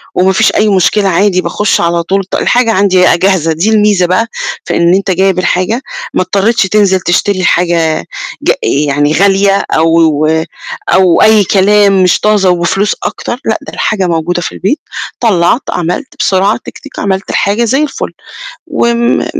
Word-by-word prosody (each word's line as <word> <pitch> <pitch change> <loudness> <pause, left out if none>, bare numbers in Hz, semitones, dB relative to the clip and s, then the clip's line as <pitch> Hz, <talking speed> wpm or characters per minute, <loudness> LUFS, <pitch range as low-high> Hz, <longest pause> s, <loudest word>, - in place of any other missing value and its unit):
وما 190 +1 +2
فيش 220 +3 +2
أي 215 0 +2
مشكلة 195 +1 +1
عادي 185 +1 +1
باخُش 195 +4 -1
على 170 0 0
طول 195 +3 -1
ط - - -5
الحاجة 240 -2 +1
عندي 190 -1 +2
بقى 180 -1 +4
جاهزة، 180 -3 +1
دي 170 +7 -1
الميزة 210 -4 +2
بقى 185 +6 0 0.4
في - - -2
إن 170 +1 +2
أنت 195 0 -1
جايب 190 0 +1
الحاجة 185 +6 -1 0.3
ما - - +1
اضطريتش 200 +5 +1
تنزِل 190 -1 +2
تشتري 185 +2 0
حاجة 170 - 0 0.4
ج - - +3
يعني 145 +1 0
غالية 195 +2 +2
أو 160 +1 +2
و 160 0 +1 0.5
أو 185 -3 +3
أي 220 -1 +5
كلام 200 0 +3
مش 180 - +2
طازة 210 -3 +2
وفلوس 180 +3 0
أكتر، 240 - -4
لأ، 220 - -1
ده - - -11
الحاجة 195 -4 -1
موجودة 170 +1 -1
في - - -4
البيت، 265 +11 -2 0.4
طلّعت، 210 +1 +2
عملت 180 - -4
بسرعة 195 +3 +1
تِك، - - -9
تِك، 285 - -11
عملت 195 0 -2
الحاجة 205 +4 0
زي 270 +6 +1
الفُل، 295 - -4 0.6
وم 235 -6 0
م - - -2
190 Hz, 170 wpm, -10 LUFS, 175-210 Hz, 0.6 s, أي